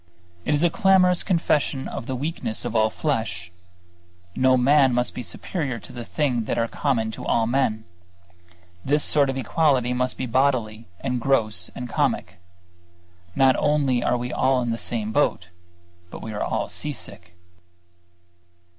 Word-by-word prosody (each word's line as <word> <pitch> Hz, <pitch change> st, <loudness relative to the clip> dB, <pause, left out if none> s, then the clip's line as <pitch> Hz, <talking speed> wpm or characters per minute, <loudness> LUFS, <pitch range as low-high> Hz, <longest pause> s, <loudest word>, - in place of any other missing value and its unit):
It 150 Hz, -, +2 dB
is 145 Hz, -, +2 dB
a 175 Hz, -, +3 dB
clamorous 190 Hz, -5 st, +4 dB
confession 150 Hz, -6 st, 0 dB
of 130 Hz, -, -6 dB
the 130 Hz, -, -2 dB
weakness 140 Hz, -5 st, -3 dB
of -, -, -4 dB
all 110 Hz, 0 st, +4 dB
flesh. 110 Hz, -, -3 dB, 0.8 s
No 130 Hz, 0 st, +4 dB
man 135 Hz, 0 st, +4 dB
must 125 Hz, 0 st, 0 dB
be -, -, -5 dB
superior 135 Hz, -, -3 dB
to -, -, -12 dB
the 120 Hz, -1 st, -6 dB
things 125 Hz, -3 st, -1 dB
that -, -, -2 dB
are 115 Hz, -, +1 dB
common 115 Hz, -4 st, -1 dB
to 115 Hz, +1 st, 0 dB
men. 110 Hz, -3 st, 0 dB, 1.0 s
This 145 Hz, +2 st, +1 dB
sort 145 Hz, -2 st, +2 dB
of 135 Hz, -, -2 dB
equality 130 Hz, -1 st, +1 dB
must 125 Hz, 0 st, -1 dB
be 130 Hz, -, -2 dB
bodily 120 Hz, -3 st, 0 dB
and 125 Hz, -2 st, -2 dB
gross 110 Hz, -9 st, +1 dB
and 125 Hz, -, -5 dB
comic. 90 Hz, -5 st, -1 dB, 1.0 s
Not 135 Hz, -1 st, +5 dB
only 140 Hz, -5 st, +1 dB
are 125 Hz, -, +1 dB
we 125 Hz, +1 st, -4 dB
all 130 Hz, -1 st, +2 dB
in 120 Hz, -, -1 dB
the 115 Hz, -, -3 dB
same 110 Hz, -2 st, -2 dB
boat, 110 Hz, -10 st, 0 dB, 0.6 s
but -, -, -9 dB
we 110 Hz, -, -6 dB
are 105 Hz, -, -4 dB
all -, -, -1 dB
seasick. 90 Hz, -11 st, -4 dB
125 Hz, 155 wpm, -24 LUFS, 115-140 Hz, 1.0 s, Not